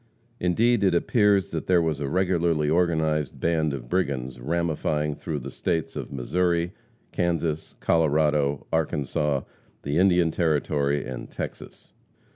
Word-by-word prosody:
Indeed, 110 +5 +2
it 95 -3 +3
appears 100 +1 +3
that 80 - -4
there 90 -1 +5
was 80 -4 0
a 70 -2 -2
regularly 85 -3 +1
organized 80 -4 +1
band 80 -2 +1
of 65 -4 -6
brigands 65 -6 -2
ramifying 75 0 -1
through 75 +1 -4
the 70 -1 -6
states 80 +4 -2
of - - -5
Missouri, 85 +6 0 0.4
Kansas, 85 -3 -1
Colorado, 75 -3 +2
Arkansas, 75 -2 0 0.4
the 70 +4 0
Indian 90 -3 +4
Territory 75 -3 0
and 65 -1 -7
Texas. - - -8
80 Hz, 125 wpm, -25 LUFS, 75-85 Hz, 0.4 s, there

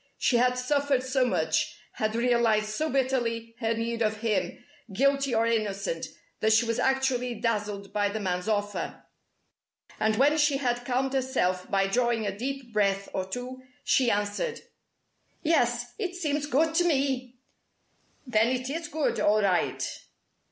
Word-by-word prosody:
She 245 - +2
had 250 +1 +3
suffered 280 0 +1
so 260 0 +1
much, - - 0
had 215 0 -2
realized 235 -3 +2
so 310 +9 -1
bitterly 240 -4 -1
her 225 -1 0
need 230 +1 -2
of 215 -1 0
him 195 -6 -1 0.3
guilty 275 +3 +2
or 225 +1 +3
innocent 200 -7 -1 0.3
that 220 0 +3
she 225 +2 +4
was 230 0 -1
actually 265 -2 +1
dazzled 210 -3 -2
by 205 -1 +1
the 215 +2 -3
man's 180 -1 -2
offer. 205 -1 -2 1.0
And 220 0 +2
when 290 +6 +3
she 290 -2 +3
had 245 -3 -1
calmed 260 +2 0
herself 250 -9 0
by 195 0 +2
drawing 235 +2 +1
a 195 -1 -2
deep 255 +1 -5
breath 200 -2 +1
or 185 -1 -2
two, 250 +4 -6 0.2
she 255 -3 +3
answered: 205 - -1 0.8
"Yes, 245 -6 +1
it 365 -4 -3
seems 295 -4 -1
good 315 +3 +2
to 350 - +4
me!" 265 -6 0 0.9
"Then 225 -3 +3
it 255 +1 -1
is 330 +1 -4
good, 300 0 -1
all 210 +1 +3
right!" 185 -3 +1
240 Hz, 150 wpm, -27 LUFS, 215-265 Hz, 1.0 s, she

